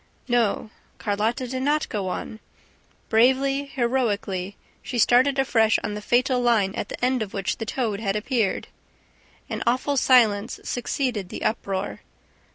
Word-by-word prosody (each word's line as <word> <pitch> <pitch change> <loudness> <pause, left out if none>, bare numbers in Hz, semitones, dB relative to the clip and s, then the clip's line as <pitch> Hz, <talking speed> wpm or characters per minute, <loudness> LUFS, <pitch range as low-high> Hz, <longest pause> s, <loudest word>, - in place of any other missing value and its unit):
No, 235 -3 +1 0.3
Carlotta 220 +5 -1
did 260 +1 -3
not 295 +3 +1
go 200 -3 -3
on... 215 +4 -5 0.7
Bravely, 265 +4 +3
heroically, 220 -8 -1 0.2
she 245 - -5
started 255 +4 +4
afresh 225 -5 +3
on 210 - -3
the 210 - -5
fatal 250 +4 +2
line 220 -5 +2
at - - -4
the - - -2
end 255 -1 +1
of 210 -3 -5
which 195 +3 -2
the 225 - -5
toad 220 -6 -1
had 200 -2 -1
appeared. 215 -2 -1 0.8
An - - -4
awful 260 +4 +1
silence 230 -5 +3
succeeded 245 -5 -2
the - - -6
uproar. 195 -3 -2
235 Hz, 145 wpm, -24 LUFS, 205-255 Hz, 0.8 s, started